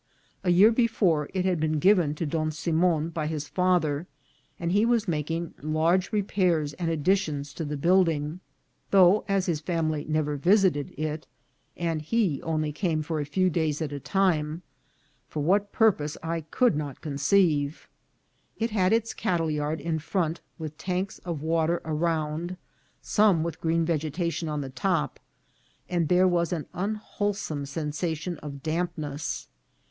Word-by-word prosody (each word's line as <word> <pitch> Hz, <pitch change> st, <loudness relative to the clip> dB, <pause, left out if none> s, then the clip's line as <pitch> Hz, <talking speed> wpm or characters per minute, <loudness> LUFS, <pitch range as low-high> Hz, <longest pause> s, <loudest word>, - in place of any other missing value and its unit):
A 185 Hz, -, +1 dB
year 190 Hz, +6 st, +7 dB
before 205 Hz, -, +2 dB
it 185 Hz, -1 st, -1 dB
had 180 Hz, -3 st, +1 dB
been 155 Hz, 0 st, +1 dB
given 175 Hz, -3 st, +4 dB
to 165 Hz, -, -2 dB
Don 155 Hz, +1 st, -1 dB
Simon 160 Hz, +1 st, +1 dB
by 155 Hz, -2 st, -3 dB
his 150 Hz, -2 st, -3 dB
father, 175 Hz, -4 st, +1 dB, 0.5 s
and 170 Hz, 0 st, -1 dB
he 205 Hz, +3 st, +3 dB
was 230 Hz, -2 st, +2 dB
making 165 Hz, +1 st, -2 dB
large 160 Hz, +5 st, +1 dB
repairs 180 Hz, -7 st, +1 dB
and 170 Hz, 0 st, -2 dB
additions 155 Hz, -3 st, 0 dB
to 165 Hz, -, -4 dB
the 150 Hz, -1 st, -3 dB
building, 165 Hz, -1 st, +2 dB, 0.5 s
though, 195 Hz, +1 st, +6 dB
as 195 Hz, -2 st, +1 dB
his 165 Hz, -4 st, 0 dB
family 155 Hz, -2 st, -1 dB
never 150 Hz, -1 st, 0 dB
visited 180 Hz, -3 st, +3 dB
it, 155 Hz, +1 st, -3 dB, 0.5 s
and 165 Hz, -2 st, -1 dB
he 180 Hz, -3 st, 0 dB
only 155 Hz, -2 st, -1 dB, 0.3 s
for 160 Hz, 0 st, -2 dB
a 145 Hz, -, -2 dB
few 185 Hz, +5 st, +2 dB
days 155 Hz, -3 st, 0 dB
at 155 Hz, -3 st, -3 dB
a 145 Hz, -, -4 dB
time, 165 Hz, -2 st, 0 dB, 0.6 s
for 150 Hz, -, -3 dB
what 200 Hz, +5 st, +2 dB
purpose 165 Hz, -10 st, +2 dB
I 165 Hz, 0 st, -2 dB
could 245 Hz, -, +3 dB
not 145 Hz, -3 st, -4 dB
con 140 Hz, -3 st, -5 dB
ceive. 150 Hz, -2 st, +2 dB, 0.7 s
It 230 Hz, 0 st, -1 dB
had 190 Hz, -3 st, +2 dB
its 230 Hz, 0 st, +1 dB
cattle 170 Hz, -6 st, 0 dB
yard 150 Hz, +1 st, -1 dB
in 165 Hz, -2 st, -2 dB
front, 165 Hz, 0 st, -1 dB, 0.2 s
with 155 Hz, -2 st, -7 dB
tanks 185 Hz, +1 st, -2 dB
of 165 Hz, -5 st, -5 dB
water 165 Hz, +1 st, +1 dB
around, 160 Hz, +2 st, -1 dB, 0.5 s
some 205 Hz, -7 st, +3 dB
with 170 Hz, 0 st, -5 dB
green 165 Hz, 0 st, +1 dB
vegetation 165 Hz, +1 st, -1 dB
on 150 Hz, -1 st, -2 dB
the 135 Hz, -1 st, -6 dB
top, 185 Hz, +8 st, -1 dB, 0.7 s
and 175 Hz, -3 st, 0 dB
there 180 Hz, +3 st, +4 dB
was 170 Hz, -2 st, +1 dB
an 165 Hz, -4 st, -2 dB
unwholesome 200 Hz, -6 st, -3 dB
sensation 160 Hz, +3 st, -3 dB
of 140 Hz, -2 st, -8 dB
dampness. 155 Hz, -3 st, -3 dB
165 Hz, 150 wpm, -27 LUFS, 150-185 Hz, 0.7 s, year